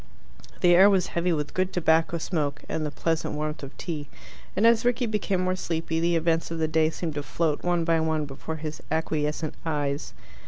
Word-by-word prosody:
The 175 -1 +6
air 190 +3 +8
was 190 -3 +3
heavy 175 +1 +1
with 150 -3 -2
good 185 0 0
tobacco 165 -1 +2
smoke 150 -4 -2
and 160 - -2
the 150 - -1
pleasant 165 +1 -1
warmth 150 +1 -3
of 140 0 -9
tea, 150 -5 -4 0.5
and 205 - +3
as 230 -1 +5
Rickie 245 +1 +2
became 210 -4 0
more 185 0 +1
sleepy 165 -2 -2
the 170 +1 +2
events 165 0 +1
of 165 - -4
the 160 -1 +1
day 155 0 +3
seemed 165 -1 -4
to 145 - -3
float 155 0 -1
one 175 -1 +1
by 165 0 +2
one 160 -1 0
before 145 +3 -6
his 155 0 -6
acquiescent 155 -1 -1
eyes. 145 -3 -2
160 Hz, 200 wpm, -26 LUFS, 155-175 Hz, 0.5 s, air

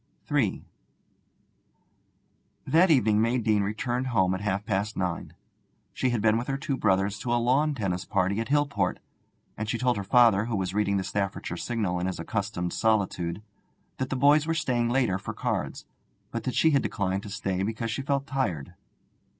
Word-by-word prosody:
III - - +1 2.0
That 175 +4 +4
evening 110 -8 +4
May 115 +3 +2
Deane 110 -3 +2
returned 120 +5 -2
home 95 -7 +2
at 95 - -3
half 100 0 -1
past 105 +1 -1
nine. 90 -2 -3 0.6
She 130 - 0
had 120 -4 -1
been 110 0 +4
with 120 - -5
her 135 - -1
two 140 -1 -2
brothers 100 -3 +1
to 120 - -3
a 120 - +3
lawn 135 +5 +2
tennis 95 -6 -2
party 100 +2 0
at 115 - -2
Hillport, 140 -10 +1 0.6
and 110 0 -4
she 120 - 0
told 125 -1 +1
her 100 - -3
father, 110 -1 +5
who 115 -1 -2
was 95 -2 -2
reading 100 -1 +1
the 95 - -1
Staffordshire 100 -3 -3
Signal 100 -3 -2
in 90 - -1
his 95 - -4
accustomed 100 -4 -3
solitude, 100 -4 0 0.6
that 130 - -2
the - - -1
boys 145 +4 +4
were 165 - +1
staying 125 -7 0
later 120 -7 +1
for - - -6
cards, - - -3 0.5
but - - -4
that 130 - -2
she 160 - +4
had 140 -2 +3
declined 100 -2 -1
to 105 - -9
stay 95 -2 -2
because 110 +3 -2
she 130 - -2
felt 140 0 -1
tired. 100 - -2
110 Hz, 185 wpm, -27 LUFS, 95-125 Hz, 2.0 s, father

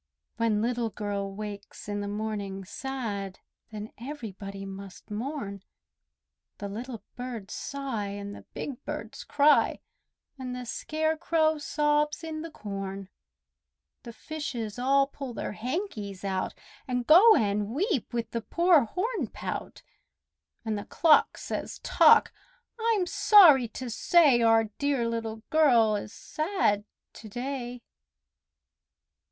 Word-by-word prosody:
When 220 -2 +1
Little 235 -1 0
Girl 200 -2 -3
wakes 205 0 -8
in 205 0 -2
the 205 - -4
morning 205 -2 -4
sad, 205 -5 -4 0.3
Then 215 0 -7
everybody 200 -7 -7
must 195 +1 -10
mourn; 210 -3 -4 1.0
The 205 - -5
little 230 +3 -6
birds 245 -6 -6
sigh, 270 -7 -4
and 200 0 -6
the - - -10
big 270 -4 -5
birds - - -6
cry, 295 +1 +4 0.6
And 250 -1 -4
the 250 0 -6
scarecrow 315 +3 0
sobs 295 +1 +1
in 315 -1 -4
the 330 - -6
corn. 195 - -6 0.9
The 235 - -9
fishes 245 -6 -5
all 275 +2 +4
pull 275 -3 -8
their - - -3
hankies 215 - -4
out, 190 -1 -2 0.3
And 250 -1 -1
go 395 - +8
and 205 - +1
weep 310 - -1
with 235 -2 -3
the 230 - -2
poor 335 - +4
hornpout, 430 - -4 0.8
And 215 -2 -1
the - - -7
clock 320 -2 +4
says, - - -5
"Tock! - - +6 0.5
I'm 445 -4 +2
sorry 340 - +7
to 240 +2 -6
say 285 0 +5
Our 225 -1 +5 0.2
dear 280 -5 +1
Little 225 -1 -4
Girl 240 -9 +5
is 205 0 -5
sad 310 - -1 0.3
to 215 - -11
day!" 245 +1 -5
235 Hz, 125 wpm, -28 LUFS, 205-295 Hz, 1.0 s, go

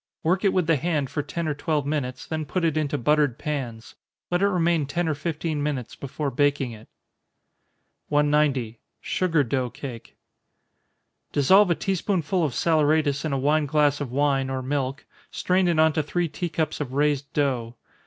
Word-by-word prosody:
Work 180 +4 +1
it 195 - +4
with 185 -3 +1
the 165 -1 +3
hand 150 -3 -1
for 150 - -1
ten 160 +3 -4
or 155 - 0
twelve 150 0 -1
minutes, 140 -4 -3
then 155 -1 -3
put 170 +4 -1
it 160 -2 +1
into 150 -2 0
buttered 145 -1 +2
pans. 125 -7 -5 0.4
Let 175 +1 +1
it 200 - +4
remain 170 -5 +1
ten 170 +4 -1
or 155 - +1
fifteen 155 0 -3
minutes 140 -5 -3
before 140 +1 -4
baking 140 -1 +1
it. 110 -1 -12 1.2
190. 145 -6 +1 0.2
Sugar 165 -5 +1
Dough 130 0 -1
Cake. 120 -2 -9 1.1
Dissolve 190 +8 +5
a 170 - +3
tea 195 +5 -1
spoonful 185 -2 0
of 145 -5 0
saleratus 155 -2 +2
in 155 - -1
a 135 - 0
wine 150 +3 +2
glass 145 -1 +2
of 135 -4 -4
wine, 135 -1 +1
or 130 -1 -3
milk 135 0 -2 0.2
strain 185 0 +1
it 170 -2 +1
on 160 0 +4
to 155 - +1
three 170 +4 -1
tea 175 +3 -4
cups 155 -2 -2
of 130 -3 -4
raised 145 0 0
dough. 125 -5 -1
150 Hz, 180 wpm, -25 LUFS, 140-160 Hz, 1.2 s, Dissolve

